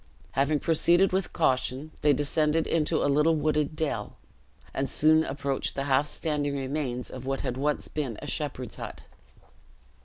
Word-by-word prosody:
Having 140 +2 +1
proceeded 175 +3 +4
with 190 -1 0
caution, 130 +3 0
they 150 - +4
descended 150 +3 +1
into 160 0 +1
a - - +2
little 150 +3 +3
wooded 150 0 0
dell, 155 -1 -3 0.6
and 135 0 -1
soon 155 +1 +4
approached 140 -2 -2
the 135 - -1
half 140 +1 +2
standing 145 -3 -1
remains 135 -2 -3
of 130 0 -8
what 135 0 -1
had 125 -3 -3
once 145 +3 -1
been 135 -8 -4
a - - -8
shepherd's 130 -5 -3
hut. - - -7
145 Hz, 155 wpm, -27 LUFS, 135-155 Hz, 0.6 s, proceeded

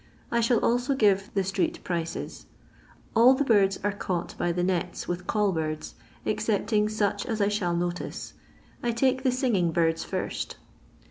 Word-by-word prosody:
I 235 - +2
shall 235 +1 +3
also 245 +3 +2
give 200 -5 +3
the 195 - +2
street 325 - -1
prices. 170 -2 -4 0.7
All 245 +4 +7
the 285 - +1
birds 200 -6 +3
are 205 - +2
caught 185 -4 -3
by 175 - 0
the 175 +1 -1
nets 180 -1 -1
with 175 +1 -4
call 210 -2 +2
birds, 155 -2 -3 0.3
excepting 210 0 +1
such 215 -2 0
as 225 -3 -2
I 200 0 +3
shall 180 -5 0
notice. 175 0 -3 0.5
I 240 -1 0
take 260 +2 +2
the 260 -1 +2
singing 230 -10 +1
birds 165 0 +1
first. - - -4
205 Hz, 160 wpm, -27 LUFS, 175-235 Hz, 0.7 s, All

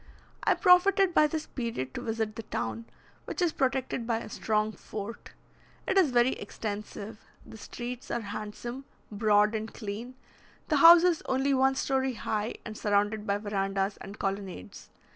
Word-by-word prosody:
I - - +3
profited 375 0 +5
by 305 - +5
this 310 +1 -3
period 230 - -4
to - - -5
visit 220 -2 -2
the 225 - -5
town, 115 - -4 0.4
which - - -6
is 350 -3 +2
protected 260 -3 -1
by 230 -2 +1
a 225 - -7
strong 215 0 0
fort. 215 +1 -8 0.5
It 385 - +1
is 375 -6 +5
very 245 +1 +3
extensive; 210 -1 -6 0.3
the - - -12
streets 245 +3 -7
are 235 - -1
handsome, 215 +5 -6 0.3
broad, 210 0 +3
and 220 0 -3
clean; 225 +4 -6 0.5
the 305 - +3
houses 335 +2 +8
only 265 +2 +1
one 265 0 +3
story 265 -1 0
high, 215 0 -2
and 215 - -6
surrounded 210 +1 0
by 200 0 +1
verandahs 195 -1 -1
and 200 +2 -10
colonnades. 195 - -5
225 Hz, 155 wpm, -29 LUFS, 205-265 Hz, 0.5 s, houses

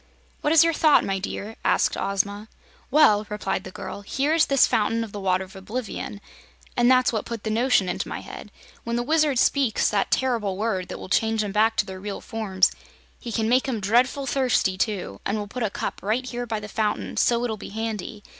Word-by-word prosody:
"What 295 - +1
is 325 -1 +7
your 330 0 +2
thought, 310 -1 +4
my 195 0 -1
dear?" 205 +3 -6
asked - - +2
Ozma. 200 +2 -1 0.4
"Well," 215 -7 +5
replied 195 -2 -3
the - - -6
girl, 200 - -7
"here 275 +9 0
is 325 -1 +4
this 275 -2 +5
Fountain 225 +2 +1
of 220 - -8
the 205 - -6
Water 185 -1 +1
of 190 +2 -14
Oblivion, 210 0 -5 0.5
and 240 0 +4
that's 255 -1 +4
what 220 - -1
put 230 -3 -6
the 220 - -2
notion 230 -4 +2
into 180 - -2
my - - -5
head. - - -10 0.3
When 235 0 -2
the 240 - 0
Wizard 305 -1 +2
speaks 260 -2 +2
that 205 -2 +1
ter'ble 230 -7 0
word 200 -4 -1
that - - -6
will - - -8
change 220 +2 +1
'em 205 - -3
back 220 +2 +2
to - - +2
their 190 -1 -8
real 200 +1 -5
forms, 195 -4 +1 0.5
he 235 - -7
can 220 0 0
make 255 +3 +2
'em 235 -4 -1
dreadful 245 +7 +2
thirsty, 250 -7 +1
too, 190 - -3
and 200 - -1
we'll 210 - -3
put 245 +5 -7
a 220 - +1
cup - - -5
right 225 +6 -1
here 245 -1 -4
by 220 -1 -2
the 210 - -8
fountain, 215 0 -2
so 235 0 +2
it'll 230 -3 -1
be 210 - -9
handy. 220 0 -5
220 Hz, 220 wpm, -24 LUFS, 200-245 Hz, 0.5 s, is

